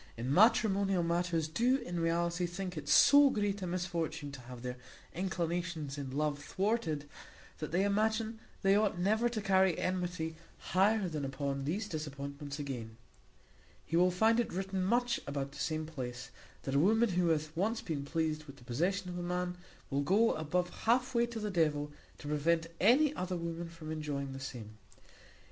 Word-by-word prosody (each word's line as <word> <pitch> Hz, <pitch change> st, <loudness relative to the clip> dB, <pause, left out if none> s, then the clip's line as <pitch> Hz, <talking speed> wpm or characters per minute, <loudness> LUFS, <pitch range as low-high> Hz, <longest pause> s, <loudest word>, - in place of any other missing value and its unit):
in 125 Hz, +4 st, -1 dB
matrimonial 200 Hz, -2 st, +4 dB
matters, 170 Hz, -1 st, 0 dB
do 240 Hz, +11 st, +2 dB
in 175 Hz, -9 st, -4 dB
reality 170 Hz, +1 st, 0 dB
think 180 Hz, +1 st, -5 dB
it 150 Hz, -2 st, -6 dB
so 285 Hz, 0 st, +8 dB
great 205 Hz, -3 st, -1 dB
a 185 Hz, -, -2 dB
misfortune 170 Hz, -5 st, -3 dB
to 135 Hz, -2 st, -9 dB
have 125 Hz, 0 st, -10 dB
their 125 Hz, 0 st, -3 dB, 0.4 s
inclinations 170 Hz, -4 st, -2 dB
in 140 Hz, -2 st, -5 dB
love 145 Hz, +1 st, -1 dB
thwarted, 185 Hz, -8 st, -1 dB, 0.5 s
that 155 Hz, -, -4 dB
they 180 Hz, +3 st, +2 dB
imagine 220 Hz, +2 st, +1 dB, 0.2 s
they 195 Hz, 0 st, +5 dB
ought 210 Hz, -3 st, +2 dB
never 215 Hz, +6 st, +2 dB
to 235 Hz, -2 st, -3 dB
carry 190 Hz, -3 st, +3 dB
enmity 175 Hz, -3 st, -2 dB, 0.2 s
higher 195 Hz, +2 st, +2 dB
than 155 Hz, -4 st, -3 dB
upon 135 Hz, 0 st, -3 dB
these 200 Hz, +8 st, -1 dB
disappointments; 140 Hz, -3 st, -5 dB
again, 120 Hz, -6 st, -5 dB, 0.9 s
he 165 Hz, -, -2 dB
will 180 Hz, +2 st, +5 dB
find 220 Hz, +6 st, +3 dB
it 240 Hz, -, 0 dB
written 190 Hz, 0 st, -2 dB
much 240 Hz, +4 st, +2 dB
about 140 Hz, -1 st, -3 dB
the 140 Hz, -, -11 dB
same 155 Hz, +3 st, -1 dB
place, 125 Hz, -6 st, -6 dB, 0.3 s
that 135 Hz, -, -3 dB
a 140 Hz, -, +4 dB
woman 220 Hz, +7 st, +4 dB
who 180 Hz, -1 st, +1 dB
hath 155 Hz, -1 st, 0 dB
once 215 Hz, +6 st, 0 dB
been 150 Hz, -4 st, -3 dB
pleased 155 Hz, +1 st, -1 dB
with 140 Hz, -2 st, -11 dB
the 120 Hz, -, -16 dB
possession 180 Hz, +11 st, -1 dB
of 180 Hz, 0 st, -4 dB
a -, -, -3 dB
man, 180 Hz, 0 st, -2 dB, 0.4 s
will 140 Hz, +1 st, +1 dB
go 205 Hz, +10 st, +3 dB
above 175 Hz, +3 st, -1 dB
halfway 240 Hz, +1 st, +3 dB
to 235 Hz, -1 st, -5 dB
the 210 Hz, -1 st, -2 dB
devil, 150 Hz, -4 st, +1 dB, 0.3 s
to -, -, -9 dB
prevent 165 Hz, +3 st, +1 dB
any 270 Hz, +9 st, +5 dB
other 185 Hz, -7 st, -3 dB
woman 170 Hz, 0 st, -4 dB
from 165 Hz, -2 st, -8 dB
enjoying 145 Hz, -3 st, -3 dB
the 135 Hz, -, -6 dB
same. 110 Hz, -5 st, -8 dB
170 Hz, 175 wpm, -33 LUFS, 145-195 Hz, 0.9 s, so